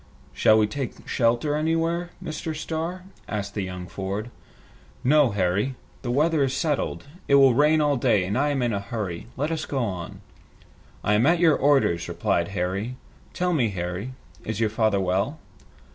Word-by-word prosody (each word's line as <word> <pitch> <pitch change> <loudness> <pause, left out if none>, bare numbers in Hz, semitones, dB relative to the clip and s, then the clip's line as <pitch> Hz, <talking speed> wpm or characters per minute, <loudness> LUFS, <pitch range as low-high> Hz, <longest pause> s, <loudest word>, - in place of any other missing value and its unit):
"Shall 110 - +5
we 110 - +4
take 120 +4 -5
shelter 120 +5 +1
anywhere, 165 +3 0
Mr. 155 0 -4
Starr?" 165 +3 -4 0.3
asked 105 -1 -4
young 90 -3 -4
Ford. 100 +6 -4 0.7
"No, 145 0 +5
Harry. 100 +5 0 0.3
The 125 - -4
weather 150 +4 +2
is 135 -1 0
settled. 150 -2 -1 0.2
It 140 - +5
will 135 -2 +7
rain 150 +4 +4
all 145 -2 +2
day, 115 -6 +3
and 100 - -2
I 145 +3 +2
am 140 -3 0
in 120 -2 0
a 100 - 0
hurry. 100 -2 -5
Let 150 +4 -1
us 160 - -3
go 140 - -3
on." 95 -9 -3 0.8
"I 105 - +2
am 110 +6 +4
at 170 +2 +5
your 165 -3 +5
orders," 135 -12 +2
replied 85 -1 0
Harry. 100 +7 -2 0.4
"Tell 180 0 0
me, 125 -8 +2
Harry, 90 +6 -4 0.3
is 110 -1 -4
your 110 -2 +1
father 110 -2 +2
well?" 95 - 0
120 Hz, 170 wpm, -25 LUFS, 100-150 Hz, 0.8 s, will